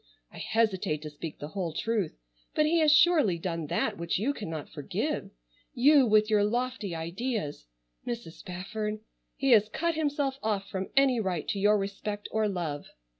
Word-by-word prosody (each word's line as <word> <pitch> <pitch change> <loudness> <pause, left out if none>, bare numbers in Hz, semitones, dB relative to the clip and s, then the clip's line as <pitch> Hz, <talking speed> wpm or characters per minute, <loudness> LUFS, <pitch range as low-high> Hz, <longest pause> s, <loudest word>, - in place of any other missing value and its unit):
I - - -9
hesitate 190 -9 0
to 150 - -6
speak 150 +1 -7
the 145 - -7
whole 175 -3 -3
truth, 220 -5 -1 0.4
but 305 - +4
he 335 +2 +3
has 310 -2 +5
surely 305 - +5
done 165 -2 -3
that - - -1
which 170 0 -1
you 245 +9 0
cannot 160 - -5
forgive. - - -3 0.5
You 275 +1 +6
with 215 0 +4
your 210 -2 +3
lofty 235 -3 -1
ideas—Mrs. 165 - -5
Spafford—he 210 - -5
has 215 -2 +6
cut 335 +8 0
himself 290 -3 -1
off 205 -2 -1
from 190 -1 -4
any 265 -3 +5
right 185 -7 -2
to 200 - -1
your 210 +2 +4
respect 205 +1 -4
or 220 0 +1
love. 170 -7 -3
210 Hz, 160 wpm, -29 LUFS, 170-245 Hz, 0.5 s, You